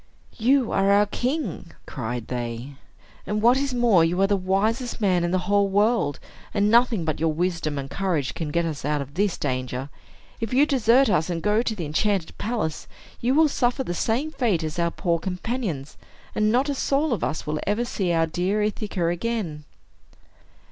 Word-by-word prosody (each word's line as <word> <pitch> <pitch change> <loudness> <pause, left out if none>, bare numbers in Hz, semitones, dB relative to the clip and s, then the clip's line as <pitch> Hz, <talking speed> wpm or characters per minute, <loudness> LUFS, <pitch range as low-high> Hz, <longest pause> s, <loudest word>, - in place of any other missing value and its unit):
"You 255 +1 +3
are 195 0 +2
our 205 +1 +5
king," 250 - -3
cried 120 -2 -5
they; 120 +1 -4 0.6
"and 210 +2 -1
what 235 +4 +5
is 275 0 -1
more, 235 -8 +4
you 170 +3 +1
are - - +5
the 200 +1 +2
wisest 210 +7 0
man 185 -5 +2
in 175 - 0
the 185 - +1
whole 200 +1 +3
world, 205 - +2 0.4
and 205 0 +3
nothing 230 -6 +4
but 155 - -2
your 160 0 +2
wisdom 165 -2 -1
and 135 -1 -4
courage 170 -5 -1
can 160 -3 -4
get 170 +3 0
us 155 -3 -4
out 150 -1 0
of 140 +1 -15
this 195 +2 0
danger. 130 0 -3 0.5
If 225 +2 -3
you 280 +3 +6
desert 260 -2 +4
us, 180 -4 +1
and 170 -2 -1
go 210 +5 +2
to 230 -2 -2
the 175 -5 -4
enchanted 180 +3 0
palace, 215 -10 -2 0.3
you 250 +3 +1
will 315 +1 +6
suffer 260 -1 0
the 175 - -3
same 240 - -1
fate 230 - 0
as 155 +2 -4
our 170 0 +2
poor 170 -1 -1
companions, 180 - -4 0.4
and 215 0 +2
not 255 +5 +2
a 285 - 0
soul 280 +1 +1
of 210 - -2
us 135 +6 -2
will 150 0 -2
ever 210 +4 +1
see 195 -7 -1
our 165 -1 +3
dear 185 +6 0
Ithaca 210 -4 -2
again." 175 -4 -2
195 Hz, 190 wpm, -24 LUFS, 160-230 Hz, 0.6 s, you